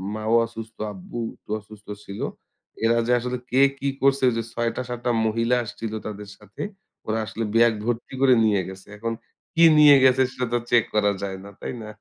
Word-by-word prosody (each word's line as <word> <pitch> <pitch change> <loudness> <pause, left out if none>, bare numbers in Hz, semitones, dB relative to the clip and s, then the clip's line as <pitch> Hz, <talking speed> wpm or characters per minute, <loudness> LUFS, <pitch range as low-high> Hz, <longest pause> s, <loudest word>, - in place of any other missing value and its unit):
মাও 110 +1 0
অসুস্থ, 115 -1 -10 0.2
আব্বু 95 +5 -8 0.2
একটু - - -33
অসুস্থ 105 0 -16 0.2
ছিল। 100 - -8 0.7
এরা 115 +1 +3
যে - - +1
আসলে 125 +1 -3
কে 130 +2 +4 0.2
কি 140 - -2
করছে? 135 0 +3
ওই - - -2
যে 115 - -1
৬ 120 -1 0
টা - - -2
৭ 120 -1 -4
টা 120 - +3 0.2
মহিলা 115 +2 +1
আসছিল 110 0 -6
তাদের 105 -1 -7
সাথে, 105 -1 -12 0.5
ওরা 110 +1 0
আসলে 115 +1 -4
ব্যাগ 115 0 +5
ভর্তি 120 +1 -3
করে 135 -1 +6
নিয়ে 105 -3 +2
গেছে। 95 0 -11
এখন 115 +2 -3 0.4
কী 165 - +5 0.2
নিয়ে 150 -1 +9
গেছে 130 0 +5
সেটা 125 -1 -3
তো - - +4
চেক 120 -2 +5
করা 105 -1 +3
যায় 95 -1 -4
না, 100 - -10
তাই - - -4
না? 110 - -8
115 Hz, 205 wpm, -24 LUFS, 105-125 Hz, 0.7 s, নিয়ে